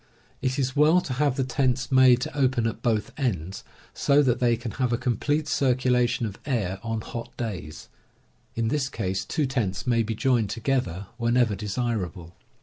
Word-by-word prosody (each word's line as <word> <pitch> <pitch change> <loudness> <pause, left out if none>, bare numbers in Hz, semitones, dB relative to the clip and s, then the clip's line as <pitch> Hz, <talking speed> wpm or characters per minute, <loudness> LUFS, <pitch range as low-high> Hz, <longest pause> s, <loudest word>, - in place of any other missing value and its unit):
It 130 0 -1
is 130 -2 -1
well 155 +4 +5
to 135 - -4
have 140 0 +1
the 135 - 0
tents 130 0 0
made 130 -2 +6
to 135 - -4
open 130 -4 +2
at 115 - -3
both 110 -4 0
ends, 95 - -2 0.3
so 145 +1 +3
that 125 -2 +1
they 120 -2 +2
can 115 0 -5
have 125 -3 -1
a 120 - +2
complete 145 +5 0
circulation 125 -3 +2
of 105 -1 -6
air 100 -9 -1
on 115 0 -3
hot 120 +2 -8
days. 90 -10 -5 0.7
In 115 -1 0
this 135 0 0
case, 95 -4 -2
two 150 - -1
tents 120 -8 -2
may 120 -2 +2
be 110 0 -2
joined 120 -3 +1
to 110 - -4
gether 110 -7 -1
whenever 120 -1 +2
desirable. 100 -4 -3
120 Hz, 180 wpm, -25 LUFS, 110-130 Hz, 0.7 s, made